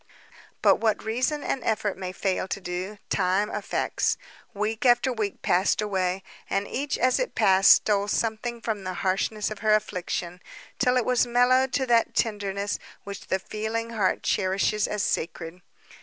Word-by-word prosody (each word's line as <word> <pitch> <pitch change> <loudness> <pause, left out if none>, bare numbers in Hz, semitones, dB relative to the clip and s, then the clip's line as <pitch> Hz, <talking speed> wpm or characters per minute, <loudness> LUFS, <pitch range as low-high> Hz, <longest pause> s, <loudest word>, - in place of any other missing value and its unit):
But - - +6
what 220 -2 0
reason 255 +7 -1
and 260 - -2
effort 215 -2 0
may 185 -1 -5
fail 190 0 -1
to 200 - -3
do, 185 +3 -5
time 195 +2 +1
effects. 210 - -1 0.3
Week 215 +1 -2
after 245 0 +4
week 215 -4 -3
passed 185 +3 +2
away, 190 -2 -1 0.3
and 200 +1 -1
each, 285 +2 -2
as 255 +1 +2
it - - -2
passed, 190 0 +6
stole 205 -1 +4
something 230 +2 -2
from 215 -4 -3
the 185 -1 -4
harshness 210 +3 0
of 215 - -6
her 215 0 +4
affliction, 180 -3 -3 0.4
till 250 0 +3
it 245 - +1
was 250 -1 +2
mellowed 255 +2 +3
to 270 -2 +1
that 235 -2 +2
tenderness 205 -2 -1 0.2
which 200 -1 -8
the 190 - +1
feeling 220 +4 -4
heart 210 -5 0
cherishes 195 +2 +1
as 210 -2 -2
sacred. 165 +2 -3
210 Hz, 160 wpm, -26 LUFS, 190-230 Hz, 0.4 s, But